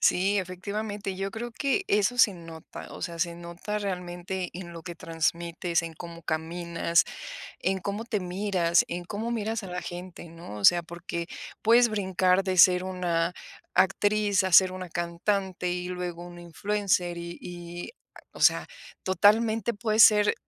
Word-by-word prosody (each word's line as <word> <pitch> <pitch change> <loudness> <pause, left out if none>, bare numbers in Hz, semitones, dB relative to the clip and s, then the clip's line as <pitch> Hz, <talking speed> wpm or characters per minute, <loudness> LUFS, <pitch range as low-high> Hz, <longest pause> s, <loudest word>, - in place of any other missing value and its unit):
Sí, 195 +3 +3
efectivamente, 200 +2 -4
yo 195 +1 -3
creo 230 +3 -5
que 280 - 0
eso 210 +4 +2
se 210 -5 +6
nota, 165 -2 -10
o - - -9
sea, 170 -1 -4
se 170 0 0
nota 170 +5 -5
realmente 180 -2 -4
en 175 -1 -8
lo 165 - -8
que 175 +1 -7
transmites 170 +1 -1
en 165 -1 -6
cómo 170 +1 -9
caminas, 170 +1 0 0.6
en 190 0 0
cómo 200 +4 -3
te 225 -3 -2
miras, 180 -2 +1
en 175 0 -5
cómo 215 +5 -4
miras 225 -1 -2
a 195 - -8
la 180 0 -4
gente, 175 0 -8
¿no? 165 -9 -10
O 100 - +1
sea, 175 0 +7
porque 170 0 -6 0.3
puedes 235 +2 +5
brincar 190 -2 +2
de 185 -1 -1
ser 180 +1 +7
una 180 -2 -1 0.4
actriz 205 0 +3
a 190 - -1
ser 185 +1 +7
una 185 -1 -7
cantante, 180 +2 -1
y 180 0 -3
luego 175 -1 -5
un 175 0 -10
influencer, 180 0 -1
y 170 0 -6
y, 175 0 -8 0.4
o - - -13
sea, - - +5 0.4
totalmente 220 +4 +3
puedes 215 +1 +4
ser 210 -1 +6
180 Hz, 160 wpm, -27 LUFS, 170-205 Hz, 0.6 s, sea